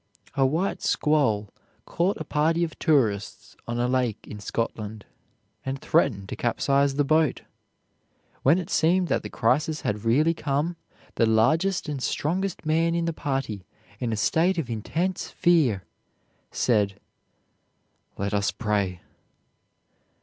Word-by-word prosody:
A 135 -1 +3
white 165 +8 -1
squall 130 -10 +1 0.3
caught 180 +4 0
a - - -3
party 160 +3 +1
of 165 - -4
tourists 115 - 0
on 120 0 -2
a 120 - +1
lake 125 -4 -1
in 105 - -8
Scotland, 110 0 -4 0.6
and 135 +1 -3
threatened 135 -11 +1
to - - -4
capsize 140 +3 +1
the 145 - +2
boat. 155 -1 +2 1.0
When 150 +6 +5
it 180 -3 -4
seemed 175 +3 +2
that - - +1
the - - -7
crisis 150 +7 +1
had 105 0 -2
really 145 +9 +3
come, 150 +2 -1 0.4
the 115 - +4
largest 160 - +2
and 145 -3 -3
strongest 175 +6 -2
man 165 +2 +2
in 170 -1 0
the 165 - -1
party, 135 -10 -3 0.4
in 120 -2 -2
a 110 - -1
state 170 - +2
of 135 -8 -2
intense 170 - -2
fear, 150 - +2 0.7
said, 100 -4 +1 1.2
"Let 100 +1 -2
us 100 -1 +1
pray." 100 -5 -1
140 Hz, 135 wpm, -25 LUFS, 110-165 Hz, 1.2 s, When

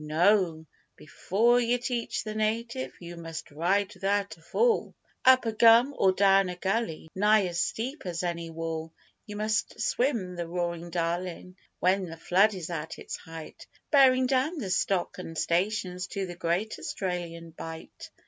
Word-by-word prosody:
No, 165 +1 +2 0.3
before 230 +10 +1
yer 240 0 +2
teach 245 -1 -3
the 215 - -5
native 230 +4 -2
you 175 -1 -9
must 165 -2 -7
ride 190 +6 0
without 200 0 -1
a 165 - -23
fall 445 - +1 0.3
Up 255 -1 +6
a 225 - +1
gum 230 +5 +6
or 190 - +4
down 195 -1 +4
a 180 - -4
gully 190 -3 -2
nigh 210 +1 +4
as 175 -1 -3
steep 255 +1 -3
as 175 0 -3
any 170 -1 -3
wall 165 0 -4 0.4
You 210 - -7
must 215 +1 -1
swim 230 -9 0
the 170 -1 -4
roarin' 170 0 -3
Darlin' 175 +1 -3 0.2
when 190 +1 +2
the 165 -1 -8
flood 195 +5 +3
is 175 -2 -6
at 160 -1 -5
its - - -6
height 165 -2 -10 0.2
Bearin' 260 -3 +6
down 270 +6 +1
the 205 -10 -3
stock 185 -1 0
an' 165 -2 -7
stations 180 +1 -1
to 195 0 -3
the 175 -1 -7
great 175 +6 -1
Australian 170 -3 -4
Bight. 160 0 -9
185 Hz, 160 wpm, -28 LUFS, 170-220 Hz, 0.4 s, Up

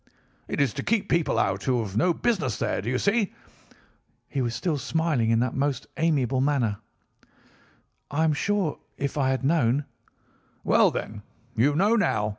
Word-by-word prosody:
"'It - - -3
is 140 -5 +2
to - - -4
keep 215 -3 0
people 170 -2 +1
out 95 0 0
who 125 -2 +2
have 100 -2 -7
no 130 +11 +3
business 170 - 0
there. - - -1
Do 110 - -3
you 125 - 0
see?' 200 - +1 0.9
He 135 - -2
was 120 -2 -1
still 160 -5 -1
smiling 150 -5 0
in 115 0 +3
the 125 - 0
most 135 -2 -1
amiable 140 -6 +1
manner. 130 -7 +1 1.3
"'I 150 +3 0
am 160 -1 +3
sure 195 0 -1 0.2
if 140 -1 -3
I 135 -3 +1
had 130 0 -1
known—' 145 -3 +2 0.8
"'Well, - - +4
then, 105 -1 -5 0.3
you 140 +6 +3
know 205 +8 +3
now. 105 - +1
140 Hz, 170 wpm, -26 LUFS, 120-165 Hz, 1.3 s, Well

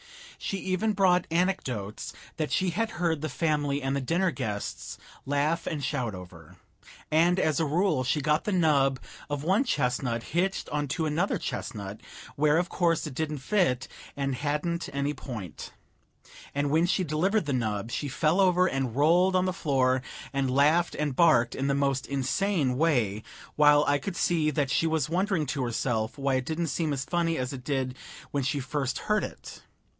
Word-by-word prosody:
She 195 - -3
even 190 +3 0
brought 185 -3 +3
anecdotes 150 - -1 0.3
that 155 -2 -2
she 185 -1 +1
had 225 +6 -1
heard 165 -3 0
the 155 - -2
family 145 -3 0
and 135 +1 0
the 140 - -1
dinner 170 +7 +1
guests 110 -9 -4 0.3
laugh 150 +4 0
and 150 -3 -3
shout 125 -9 -2
over; 90 -3 -12 0.6
and 170 +4 +4
as 155 -3 +1
a 160 - +2
rule 155 -2 +1
she 130 +4 +1
got 150 +2 +1
the 210 - 0
nub 145 -7 +3 0.3
of 145 -1 -3
one 190 - +3
chestnut 125 - -1
hitched 185 +4 -1
onto 150 +2 -1
another 160 +6 0
chestnut, 105 -3 -5 0.3
where, 150 +1 +3
of 175 +1 0
course, 170 -3 +1
it 150 - -6
didn't 155 +2 -2
fit 140 - +1 0.3
and 140 -1 -1
hadn't 150 +5 -2
any 140 +1 -1
point; 110 - -7 0.8
and 145 0 0
when 160 +3 +3
she 185 +1 +1
delivered 180 +6 +1
the 145 - -1
nub 110 -3 -2
she 145 - -2
fell 155 +7 +2
over 180 -1 +4
and 135 -8 -1
rolled 175 +6 +4
on 185 0 +3
the 185 - 0
floor 130 -7 +1 0.3
and 135 -1 0
laughed 150 +6 +3
and 150 -3 -2
barked 130 -8 +4
in 135 - -2
the 140 - +2
most 140 -1 0
insane 140 +1 0
way, 125 -9 +1 0.3
while 150 0 +6
I 145 0 +3
could 195 +3 -5
see 160 -3 +2
that 140 -2 0
she 165 - +2
was 160 -3 0
wondering 185 -2 +1
to 140 0 -2
herself 115 0 -1
why 140 -1 0
it 130 -1 0
didn't 165 +3 -2
seem 155 +1 -1
as 140 -1 -2
funny 170 -1 0
as 130 +1 -3
it 130 -2 -7
did 130 -2 -1 0.4
when 140 - 0
she 140 +2 0
first 135 0 -2
heard 210 0 0
it. - - -8
150 Hz, 180 wpm, -28 LUFS, 130-170 Hz, 0.8 s, while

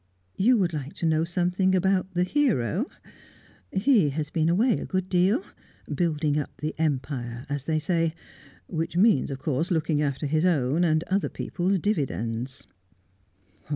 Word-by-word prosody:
You 240 +6 +4
would 180 -5 +1
like 145 -2 -5
to - - -3
know 160 0 +2
something 180 +2 +1
about 190 0 +1
the 175 - +3
hero? 205 - +1 0.8
He 200 - +3
has 150 +2 -3
been 160 0 +1
away 220 +7 +3
a - - -4
good 185 -1 -2
deal 190 - +2 0.5
building 155 -4 0
up 145 - -6
the 155 +1 -3
Empire, 130 -5 -2
as 145 -1 -3
they 160 -1 +1
say; 165 +1 0 0.5
which 165 +1 -3
means, 195 - +4
of 135 - -4
course, 145 +4 -1
looking 155 -3 +1
after 140 0 -1
his 155 +3 +1
own 155 -2 +2
and 155 -1 +2
other 195 +2 0
people's 185 +2 -1
dividends." 130 - -2
165 Hz, 155 wpm, -26 LUFS, 145-185 Hz, 0.8 s, You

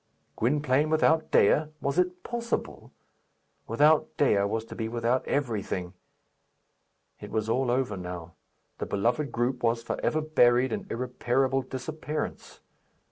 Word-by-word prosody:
Gwynplaine 145 +3 +1
without 160 0 +3
Dea! 150 +9 +4
Was 140 +4 0
it 180 0 0
possible? 235 -1 -4 0.8
Without 150 +6 +3
Dea 130 -8 +3
was 110 +2 -2
to - - -10
be 110 -1 -3
without 120 +2 0
everything. 105 -9 -2 1.3
It - - -9
was 110 0 -1
all 125 +3 +1
over 125 -4 0
now. 90 -2 -7 0.5
The - - -3
beloved 120 +9 0
group 120 +2 -1
was 115 0 +1
for - - -3
ever 155 - +1
buried 130 -5 +3
in 205 -2 -4
irreparable 125 +2 0
disappearance. 150 +4 -5
130 Hz, 130 wpm, -28 LUFS, 115-150 Hz, 1.3 s, Dea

